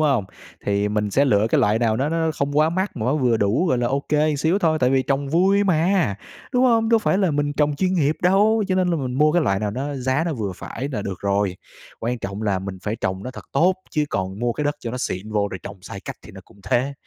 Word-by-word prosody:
hông? 140 -9 +2 0.4
Thì 100 0 +1
mình 105 0 -1
sẽ 135 +8 +3
lựa 105 -5 +3
cái - - +3
loại 105 +2 +3
nào 110 -2 +1
nó 135 +4 0
nó 165 0 0
không 140 +1 -1
quá 155 +1 +4
mắc 190 +1 -2
mà 110 - -2
nó 130 - +2
vừa 125 -5 +2
đủ, 110 - +1
gọi 130 -7 +1
là, 120 - +1
ô 135 +3 0
kê 150 0 +2
xíu 160 +7 +1
thôi, 160 -5 +2
tại 125 - +3
vì 135 0 +3
trồng 135 +1 -1
vui 190 +6 +3
mà, 175 - +2 0.4
đúng 250 0 +3
hông? 230 -3 +3
Đâu 230 0 +5
phải 195 -3 +1
là 190 -4 +2
mình 145 0 0
trồng 145 0 +1
chuyên 185 +3 +1
nghiệp 155 -3 +1
đâu, 205 +5 +4
cho 185 - +1
nên 185 -1 +2
là 170 - +1
mình 130 -4 -3
mua 150 +3 +3
cái 175 0 +3
loại 95 -8 +1
nào 105 -1 -1
nó 135 +6 -4
giá 130 +3 0
nó 170 - -1
vừa 105 -6 -3
phải 130 +8 -6
là 105 - -2
được 95 -2 -5
rồi. 100 -2 0 0.4
Quan 120 +2 -2
trọng 100 0 -5
là 100 -3 +1
mình 95 0 -6
phải 105 +1 -2
trồng 95 -2 -3
nó 125 - -5
thật 125 - -11
tốt 175 +7 +3 0.2
chứ 150 -2 +1
còn 95 +1 -3
mua 120 +1 0
cái 150 - -3
đất 145 0 0
cho 115 - -4
nó 125 - -4
xịn 105 -3 -4
vô 105 -1 +1
rồi 95 - -5
trồng 100 0 -8
sai 100 +1 -8
cách - - -7
thì - - -12
nó - - -10
cũng 100 - -21
thế. 130 +7 0
135 Hz, 280 wpm, -22 LUFS, 105-160 Hz, 0.4 s, Đâu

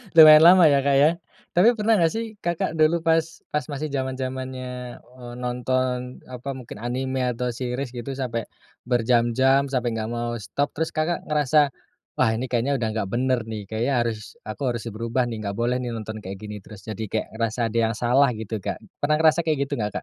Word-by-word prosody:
Lumayan 155 -1 +10
lama 180 0 +8
ya, 140 -2 +4
Kak, 140 0 +3
ya? 145 +2 +6 0.5
Tapi 215 +7 +6
pernah 220 -1 +2
nggak 165 -2 +3
sih, 225 +1 -2
Kakak 170 -3 -2
dulu 160 +2 +3
pas 165 0 +3 0.3
pas 150 -3 -1
masih 150 +2 -4
zaman-zamannya, 130 -2 -4
eee, 120 0 -12
nonton, 125 0 -2
apa, 125 +2 -7
mungkin 125 -5 -9
anime, 130 +3 -2
atau 125 +1 -2
series 125 +2 -3
gitu, 120 +3 -5
sampai 125 -4 -3 0.4
berjam-jam, 125 +3 +3
sampai 125 -3 0
nggak 110 0 -3
mau 120 0 -2
stop, 140 +7 -2
terus 160 +2 -1
Kakak 160 +2 -1
ngerasa, 150 -1 +3 0.5
"Wah, - - +4
ini 120 +3 -2
kayaknya 130 +3 +1
udah 115 - -1
nggak 110 -3 -2
bener 130 +3 +1
nih, 110 -2 -5
kayaknya 110 +6 -1
harus 110 - -5
aku 135 -3 -3
harus 120 - -6
berubah 115 +3 -1
nih, 115 -2 -5
nggak 100 -1 -4
boleh 120 +2 +1
nih 125 - -3
nonton 110 0 -6
kayak 95 0 -7
gini 105 +1 -7
terus." 105 0 -13
Jadi 110 -1 -5
kayak 110 - -2
ngerasa 115 +1 -2
ada - - -1
yang 115 - -3
salah 125 +4 +4
gitu, 110 0 -4
Kak. - - -3 0.2
Pernah 150 +1 +3
ngerasa 160 +1 +4
kayak 160 -2 0
gitu - - -6
nggak, 105 0 -1
125 Hz, 195 wpm, -24 LUFS, 115-145 Hz, 0.5 s, Lumayan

